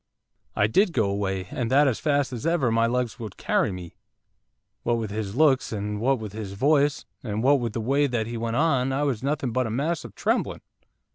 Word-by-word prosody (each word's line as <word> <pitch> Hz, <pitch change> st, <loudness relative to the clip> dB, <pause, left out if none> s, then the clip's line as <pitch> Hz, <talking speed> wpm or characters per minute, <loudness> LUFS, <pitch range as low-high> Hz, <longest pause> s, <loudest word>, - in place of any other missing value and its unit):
'I 105 Hz, -, +3 dB
did 180 Hz, -, +2 dB
go 110 Hz, -7 st, +2 dB
away, 95 Hz, -2 st, -2 dB
and 120 Hz, -3 st, -2 dB
that 140 Hz, +3 st, +5 dB
as 125 Hz, -, 0 dB
fast 145 Hz, -3 st, +1 dB
as 125 Hz, +6 st, -3 dB
ever 160 Hz, -8 st, +2 dB
my 115 Hz, +1 st, +3 dB
legs 125 Hz, 0 st, -1 dB
would 110 Hz, -4 st, -7 dB
carry -, -, +1 dB
me, 90 Hz, -2 st, -8 dB, 0.9 s
what 120 Hz, 0 st, +1 dB
with 110 Hz, -3 st, -4 dB
his 105 Hz, -1 st, -4 dB
looks, 140 Hz, -2 st, +3 dB
and 105 Hz, -1 st, -3 dB
what 135 Hz, +3 st, +2 dB
with 110 Hz, -3 st, -7 dB
his 105 Hz, -3 st, -6 dB
voice, 145 Hz, +6 st, +2 dB, 0.2 s
and 110 Hz, -2 st, -3 dB
what 140 Hz, +2 st, +5 dB
with 115 Hz, -3 st, -3 dB
the 115 Hz, -, -2 dB
way 140 Hz, +5 st, +2 dB
that 120 Hz, -4 st, -1 dB
he 120 Hz, +1 st, -5 dB
went 115 Hz, 0 st, -2 dB
on, 135 Hz, -3 st, +2 dB
I 135 Hz, +2 st, 0 dB
was 130 Hz, -6 st, -1 dB
nothing 140 Hz, -2 st, -1 dB
but 130 Hz, +1 st, 0 dB
a -, -, -4 dB
mass 150 Hz, +9 st, -1 dB
of -, -, -11 dB
trembling. -, -, -1 dB
120 Hz, 220 wpm, -25 LUFS, 110-140 Hz, 0.9 s, that